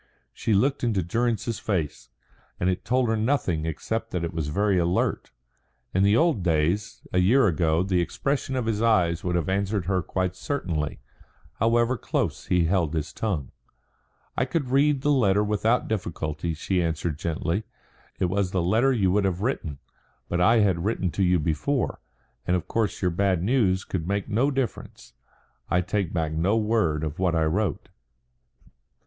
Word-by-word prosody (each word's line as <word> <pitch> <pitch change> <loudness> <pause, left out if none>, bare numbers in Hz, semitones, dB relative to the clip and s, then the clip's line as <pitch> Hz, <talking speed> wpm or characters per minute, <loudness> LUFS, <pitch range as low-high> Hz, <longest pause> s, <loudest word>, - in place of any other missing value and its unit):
She 110 - -1
looked 135 +8 +1
into 105 -6 +1
Durrance's 115 +4 -1
face, 90 -9 -3 0.5
and 90 +1 +2
it 90 - -4
told 125 +1 +1
her 110 - +1
nothing 110 - 0
except 110 +8 -3
that 90 -2 -3
it 85 - -3
was 80 -3 -2
very 100 +4 +1
alert. 85 +2 0 0.6
In 95 - +2
the 100 +3 +4
old 160 - +2
days, 85 +4 0
a 90 - +3
year 115 +9 +4
ago, 80 -2 +2
the 95 -2 +1
expression 135 - -2
of 125 -3 -1
his 110 -1 -1
eyes 90 -8 +2
would 90 -1 -1
have 85 -3 0
answered 100 0 0
her 95 0 +1
quite 95 +2 -2
certainly, 90 - -3 0.6
however 120 +2 +2
close - - -2
he 90 -1 +3
held 85 -3 +1
his 75 -2 -3
tongue. 90 -12 -3 0.8
"I - - +1
could 130 -1 -2
read 140 0 +3
the 145 - +2
letter 105 -7 +3
without 105 +3 +1
difficulty," 80 -5 -3
she 90 +4 0
answered 80 -2 -2
gently. 85 +4 -2 0.6
"It - - +2
was 95 +1 0
the 95 -1 0
letter 115 +9 +3
you 100 -8 +2
would 100 +1 +2
have 95 -1 -1
written. 90 - -2 0.5
But 90 0 -1
I 115 +4 +5
had 95 -5 +1
written 95 -4 -1
to 95 - 0
you 90 0 +4
before, 85 - -1 0.5
and 90 - +3
of 90 - -3
course 110 -3 -1
your 90 - +2
bad 95 -1 +1
news 100 -5 +2
could 85 -3 -3
make 100 0 -1
no 120 +7 +2
difference. 125 - -4 0.6
I 90 - +2
take 95 -1 -1
back 80 -3 -1
no 85 +8 +1
word 105 -9 +1
of 75 +1 -4
what 90 -3 +1
I 80 - +2
wrote." 90 0 -1
95 Hz, 175 wpm, -25 LUFS, 85-110 Hz, 0.8 s, I